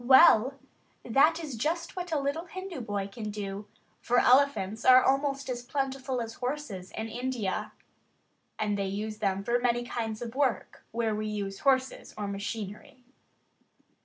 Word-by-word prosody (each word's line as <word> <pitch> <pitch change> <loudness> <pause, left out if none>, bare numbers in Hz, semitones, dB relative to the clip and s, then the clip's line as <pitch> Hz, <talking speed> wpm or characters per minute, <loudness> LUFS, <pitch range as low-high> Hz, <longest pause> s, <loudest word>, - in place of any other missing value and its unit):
Well, 260 -1 +7 0.5
that 300 +8 +4
is 310 -5 -6
just 330 - -2
what 360 -1 -5
a 315 - +2
little 285 +5 -2
Hindu 375 -4 -6
boy 205 -3 -3
can 210 +1 -6
do, 205 0 -5 0.3
for 245 - +1
elephants 245 -6 +3
are 255 0 +8
almost 275 0 +1
as 245 -2 -3
plentiful 265 0 -2
as 225 0 -7
horses 245 -9 -4
in 220 - -2
India; 240 -3 -3 0.8
and 205 -1 -1
they 195 - 0
use 215 +2 -4
them 195 -2 0
for 240 +3 +1
many 240 0 +1
kinds 225 -3 -3
of 230 -1 -6
work 260 -6 -1
where 225 -1 -1
we 215 0 -2
use 200 -2 -4
horses 265 -1 +1
or 205 -1 -3
machinery. 210 +5 -6
240 Hz, 155 wpm, -29 LUFS, 210-275 Hz, 0.8 s, are